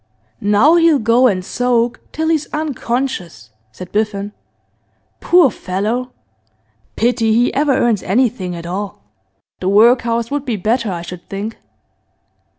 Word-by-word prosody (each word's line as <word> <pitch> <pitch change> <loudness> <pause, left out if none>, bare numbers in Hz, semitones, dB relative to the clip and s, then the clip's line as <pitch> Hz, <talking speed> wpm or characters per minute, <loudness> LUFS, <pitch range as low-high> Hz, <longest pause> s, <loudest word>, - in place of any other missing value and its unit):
'Now 210 +12 +4
he'll 330 -3 +4
go 235 +2 +3
and 185 -5 -1
soak 245 0 0
till 320 +1 -2
he's 315 -2 -1
unconscious,' 245 - -3 0.2
said 175 +11 -10
Biffen. 205 -1 -2 0.9
'Poor 345 -7 +4
fellow! 215 +9 -3 0.8
Pity 230 -1 +1
he 240 +2 +2
ever 285 -1 +2
earns 230 -5 +1
anything 205 -4 0
at 170 0 -8
all. 190 - -5 0.6
The 185 - -1
workhouse 230 +2 +3
would 290 -1 -2
be 245 -5 -2
better, 220 +2 -1
I 170 -1 -5
should 175 0 -10
think. 205 +3 -5
230 Hz, 130 wpm, -17 LUFS, 195-255 Hz, 0.9 s, Now